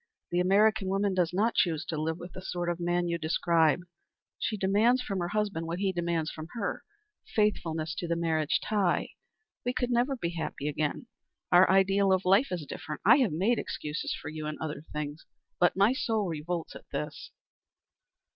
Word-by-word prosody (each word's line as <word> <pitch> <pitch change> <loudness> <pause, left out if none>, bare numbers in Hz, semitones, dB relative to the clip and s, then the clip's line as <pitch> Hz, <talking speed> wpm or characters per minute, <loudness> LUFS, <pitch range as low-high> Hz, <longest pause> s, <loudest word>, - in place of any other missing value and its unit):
"The 175 - +1
American 200 +2 +3
woman 195 +1 +1
does 180 -3 +1
not 210 +6 +1
choose 165 -2 +1
to 165 - -3
live 160 +1 -1
with 175 0 -9
the 185 - -8
sort 175 -2 -3
of 175 0 -2
man 175 0 0
you 170 0 -1
describe. 165 0 +2 0.6
She 215 - -1
demands 215 +6 +3
from 195 -5 -3
her 175 - -1
husband 205 -4 -1
what 170 +1 -3
he 195 0 +1
demands 170 -2 -1
from 155 0 -8
her, 230 -4 -3 0.5
faithfulness 165 -7 0
to 175 - -3
the 170 - 0
marriage 160 -3 +1
tie. 200 -5 +1 0.5
We 245 - -1
could 250 -1 0
never 245 +3 +2
be 170 -9 -2
happy 160 -4 -4
again. 150 +7 -2 0.5
Our 180 +1 +7
ideal 195 +1 +4
of 190 0 +2
life 195 +9 +5
is 175 -5 -3
different. 150 +2 -7
I 230 +6 +8
have 255 -8 +2
made 195 +10 +1
excuses 150 +1 -4
for - - -7
you 155 -1 -5
in 150 - -4
other 150 -2 -4
things, 150 +1 -5 0.4
but 175 - +4
my 200 +5 +5
soul 225 -7 0
revolts 165 +1 -4
at - - -12
this." 145 +1 -5
175 Hz, 185 wpm, -29 LUFS, 160-200 Hz, 0.6 s, I